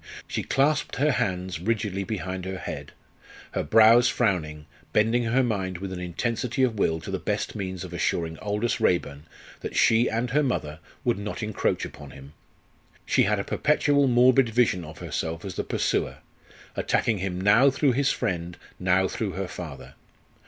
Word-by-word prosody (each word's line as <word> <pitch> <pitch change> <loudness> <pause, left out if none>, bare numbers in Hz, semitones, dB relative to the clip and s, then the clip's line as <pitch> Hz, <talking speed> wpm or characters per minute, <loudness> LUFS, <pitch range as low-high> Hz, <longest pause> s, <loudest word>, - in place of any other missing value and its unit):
She - - -2
clasped 150 +2 +1
her 150 +3 +2
hands 90 - -2
rigidly 100 0 -1
behind 95 -3 -4
her 95 0 -4
head, - - -6 0.6
her - - -1
brows 115 - +6
frowning, 80 -9 -1 0.3
bending 115 +3 +2
her 125 +4 +2
mind 95 -6 -2
with 95 +1 -6
an 90 - -5
intensity 115 +8 -2
of 115 -5 +1
will 80 -4 +1
to - - -7
the - - -2
best - - -2
means 95 -3 -4
of 90 -1 -8
assuring 85 -1 -1
Aldous 105 +3 -1
Raeburn 75 -4 0 0.3
that - - -6
she 115 +2 +4
and 115 +2 -1
her 150 +4 +3
mother 80 - -2 0.3
would 120 -5 +1
not 105 +1 -5
encroach 105 -1 -1
upon 70 -1 -10
him. 70 +2 -13 0.7
She - - +3
had - - +1
a - - -2
perpetual 145 -2 +2
morbid 125 0 +5
vision 110 -6 +2
of 75 0 -10
herself 85 +2 -4
as 95 - -5
the - - -3
pursuer, - - -1 0.6
attacking 110 -4 +1
him 90 -1 -3
now 105 +8 +5
through 140 0 +2
his 135 +3 +1
friend, 85 -1 -3 0.2
now 95 +1 +2
through 105 -2 -3
her 95 0 -3
father. 80 -6 -8
100 Hz, 170 wpm, -26 LUFS, 90-120 Hz, 0.7 s, brows